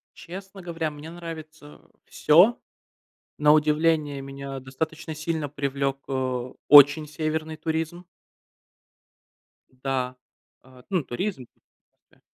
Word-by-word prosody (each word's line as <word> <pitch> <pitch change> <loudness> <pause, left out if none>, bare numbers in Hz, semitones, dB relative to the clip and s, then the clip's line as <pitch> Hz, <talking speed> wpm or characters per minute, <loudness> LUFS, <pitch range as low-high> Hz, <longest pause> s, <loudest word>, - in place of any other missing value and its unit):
Честно 190 +2 -10
говоря, 165 -3 -3
мне 150 +2 -10
нравится 160 -3 -10 0.2
всё. 180 +10 +4 0.8
На 150 0 +5
удивление, 150 -2 +2
меня 135 0 -7
достаточно 160 +4 -5
сильно 155 -1 -3
привлёк, 140 -1 -2
э, 130 -2 -2 0.2
очень 145 +1 +8
северный 155 0 -3
туризм. 160 +2 -3 1.6
Да. 130 -1 -3 0.5
Э, 130 -1 -17
ну, 185 -6 0
туризм. 135 0 -4 0.6
Все. - - -28
150 Hz, 95 wpm, -25 LUFS, 135-160 Hz, 1.6 s, очень